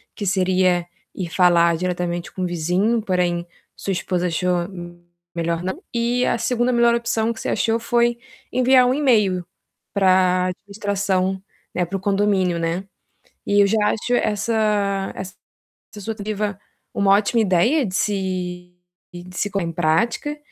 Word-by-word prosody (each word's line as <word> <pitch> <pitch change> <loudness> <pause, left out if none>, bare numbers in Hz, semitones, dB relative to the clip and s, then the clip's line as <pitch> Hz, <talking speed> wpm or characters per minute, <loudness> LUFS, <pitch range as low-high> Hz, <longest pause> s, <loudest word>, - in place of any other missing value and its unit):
que 205 - -4
seria 185 -2 +2 0.3
ir 180 -3 -4
falar 170 -1 +4
diretamente 175 0 -3
com 185 - -4
o - - +1
vizinho, 180 +7 0
porém 180 -3 0 0.3
sua 195 - -4
esposa 180 -1 -1
achou 175 +1 0
me 175 -2 -10 0.3
melhor 170 0 -1
não. 185 +1 -4
E 240 +1 +1
a - - +1
2ª 240 +1 0
melhor 235 -1 +4
opção 230 -1 0
que 225 - -11
você - - -3
achou 225 0 +1
foi 235 +1 +1 0.3
enviar 255 0 +5
um 250 - +2
e-mail 210 -11 +2 0.5
para 185 -2 +3
administração, 195 -1 -2 0.3
né, 180 - 0
para 195 +3 -3
o - - -7
condomínio, 195 -3 +1
né. 165 +3 -1 0.6
E 205 0 +3
eu - - +4
já 220 +3 +1
acho 245 +3 -1
essa 210 -3 0
essa 190 -1 -7 0.7
sua 225 +3 -4
tentativa 210 -1 -3 0.4
uma 200 -1 +3
ótima 210 +3 +3
ideia 220 - +3
de 185 - -6
se 180 -3 -2 0.4
de 180 +1 -10
se 205 - -1
pôr 200 -1 -1
em 165 0 -3
prática. 225 - 0
195 Hz, 150 wpm, -21 LUFS, 180-220 Hz, 0.7 s, enviar